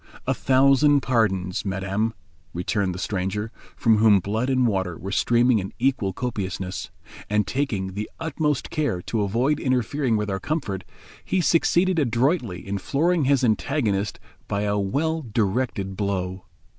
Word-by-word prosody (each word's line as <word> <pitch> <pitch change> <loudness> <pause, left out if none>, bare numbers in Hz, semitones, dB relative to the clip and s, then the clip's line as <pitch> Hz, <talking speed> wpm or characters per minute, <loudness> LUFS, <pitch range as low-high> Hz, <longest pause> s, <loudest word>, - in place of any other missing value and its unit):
"A - - +2
thousand 140 +2 +4
pardons, 95 -8 0
madame," 100 +3 -1 0.4
returned 95 +1 -1
the - - -5
stranger, 100 +3 -2 0.3
from 110 -2 +3
whom 105 -2 +6
blood 110 +7 -1
and 130 -1 +3
water 95 -6 -1
were 95 - -6
streaming 120 +2 +3
in 95 0 -6
equal 125 -6 +1
copiousness; 95 -4 -4 0.4
and 105 0 +2
taking 100 -8 -2
the 105 +2 -4
utmost 150 -3 -1
care 140 -13 -1
to 110 - -1
avoid 120 +9 +1
interfering 130 -1 0
with 105 0 -2
our 95 - -2
comfort, 105 - -3 0.4
he 190 - 0
succeeded 175 +1 +3
adroitly 120 - 0
in 100 0 -2
flooring 160 - +1
his 135 -1 +3
antagonist 110 -3 0 0.3
by 100 0 -1
a 105 0 0
well 160 +11 0
directed 105 -4 -1
blow. 95 -2 -2
110 Hz, 145 wpm, -24 LUFS, 95-135 Hz, 0.4 s, whom